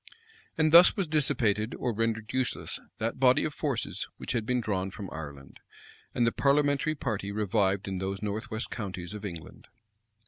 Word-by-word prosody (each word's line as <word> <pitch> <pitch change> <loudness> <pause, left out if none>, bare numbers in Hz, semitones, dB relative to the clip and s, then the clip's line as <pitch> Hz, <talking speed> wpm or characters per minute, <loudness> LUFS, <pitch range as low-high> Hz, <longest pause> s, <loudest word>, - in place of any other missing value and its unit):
And 155 -1 +3
thus 170 +5 +8
was 195 - +1
dissipated 125 - +1
or 125 - -1
rendered 115 0 -1
useless 130 -1 -1 0.2
that 115 +3 -2
body 130 -1 +5
of 155 - -2
forces 140 -7 -2
which - - -5
had 110 -2 -1
been 125 0 +2
drawn 95 -4 -1
from 95 -1 -8
Ireland; 70 -4 -9 0.6
and 120 - +3
the 115 - +3
parliamentary 145 +2 +2
party 110 -8 -3
revived 100 -2 +1
in 95 -1 -3
those 95 +1 -3
north 105 +3 -3
west 110 +1 -4
counties 95 -4 -5
of 105 -1 -7
England. 85 -6 -8
110 Hz, 170 wpm, -29 LUFS, 100-130 Hz, 0.6 s, thus